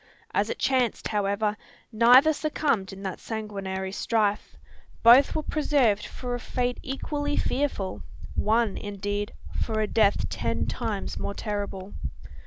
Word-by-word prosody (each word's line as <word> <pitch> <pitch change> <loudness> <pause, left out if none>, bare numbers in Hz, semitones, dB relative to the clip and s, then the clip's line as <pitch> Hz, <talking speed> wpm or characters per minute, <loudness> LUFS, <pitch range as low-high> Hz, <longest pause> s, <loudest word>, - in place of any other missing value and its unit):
As - - +1
it - - -3
chanced, 255 -4 +1
however, 210 0 0 0.4
neither 250 +7 +7
succumbed 290 -10 0
in 195 +1 -9
that 190 -2 -4
sanguinary 195 -4 -4
strife. 210 0 0 0.5
Both 245 +4 +7
were 310 - 0
preserved 265 -10 +2
for 250 -1 -5
a 245 - -2
fate 245 +1 -2
equally 290 +2 -3
fearful: 255 -10 -1 0.3
one, 220 -1 +1
indeed, 205 0 -3 0.3
for 220 -2 -1
a 215 - +2
death 210 -1 +2
ten - - -1
times 210 -3 -3
more 200 - -3
terrible. 205 -2 -4
215 Hz, 130 wpm, -26 LUFS, 200-250 Hz, 0.5 s, neither